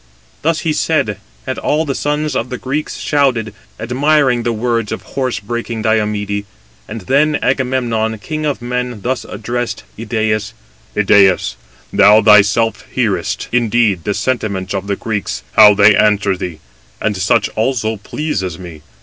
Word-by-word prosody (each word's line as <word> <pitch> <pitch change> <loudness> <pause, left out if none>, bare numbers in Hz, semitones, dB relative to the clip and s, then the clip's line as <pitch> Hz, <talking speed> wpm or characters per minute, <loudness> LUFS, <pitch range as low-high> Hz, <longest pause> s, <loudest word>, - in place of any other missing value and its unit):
Thus 160 +1 0
he 160 - 0
said, 110 -12 0 0.3
and 130 - -3
all 155 +2 0
the 140 - -2
sons 150 +2 -1
of 120 - -2
the 125 - -4
Greeks 140 +5 -3
shouted, 125 -8 0 0.3
admiring 130 +2 +2
the 120 - -1
words 115 -1 -1
of - - -4
horse 130 -2 -1
breaking 115 +1 -4
Diomede: 105 -2 0 0.4
and 110 +1 -6
then 145 +8 +2
Agamemnon, 120 -4 0
king 155 +8 -5
of 145 -5 -2
men, 125 -2 -3
thus 130 +1 -2
addressed 120 +2 -4 0.2
Idæus: 110 -2 -1 0.4
"Idæus, 100 -8 +4 0.4
thou 105 +2 +6
thyself 105 +1 +4
hearest, - - -1
indeed, 115 -6 +2
the 100 - -1
sentiments 100 -7 -2
of 100 0 -3
the 100 - 0
Greeks, 105 -1 -4
how 105 -1 +7
they 105 +1 +6
answer 105 -2 +2
thee; 85 -4 -6 0.4
and 105 -1 -1
such 95 0 +1
also 110 -1 -1
pleases 100 - -3
me. 85 -4 -10
110 Hz, 145 wpm, -16 LUFS, 105-130 Hz, 0.4 s, how